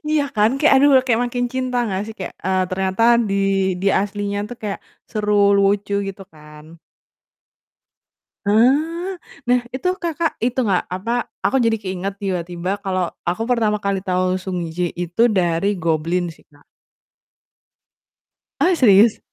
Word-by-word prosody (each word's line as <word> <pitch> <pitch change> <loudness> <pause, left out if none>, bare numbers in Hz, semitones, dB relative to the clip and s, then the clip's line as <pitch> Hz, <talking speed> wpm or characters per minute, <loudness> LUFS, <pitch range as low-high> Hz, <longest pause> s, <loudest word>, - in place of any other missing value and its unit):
Iya 305 -2 +3
kan? 210 +1 +4
Kayak, 305 - +4
aduh, 285 +2 +5 0.2
kayak 235 -1 +2
makin 245 0 -2
cinta 255 -1 -2
gak 190 - -1
sih? 220 - -8
Kayak, 185 - -6
eee, 190 0 +1
ternyata 190 +3 -1 0.3
di 195 - -1 0.5
di 200 - -1
aslinya 205 0 -3
tuh 245 - -8
kayak 205 -2 -3 0.3
seru, 210 -1 -1 0.3
lucu, 200 +1 +1
gitu 195 0 -8
kan. 150 -1 -14 1.8
Ah, 305 - +2 0.3
nah 245 0 +3
itu, 260 +7 -5 0.2
Kakak, 330 -1 -1
itu 250 +2 -1
gak 190 -3 +2
apa, 230 +7 -2 0.2
aku 270 - +1
jadi 225 -1 +2
keinget 195 0 -5
tiba-tiba 180 -1 -3
kalau 185 -2 -1 0.2
aku 180 +6 -2
pertama 220 -4 +1
kali 200 -1 -2
tau 185 -1 0
Sung 185 -2 -3
Ji 175 0 -1
itu 175 +7 +2
dari 185 0 +1
Goblin 165 +2 0
sih, - - -23
Kak. 145 0 -23 2.0
Ah, 365 +1 +4
serius? 215 - +5
200 Hz, 145 wpm, -20 LUFS, 185-240 Hz, 2.0 s, aduh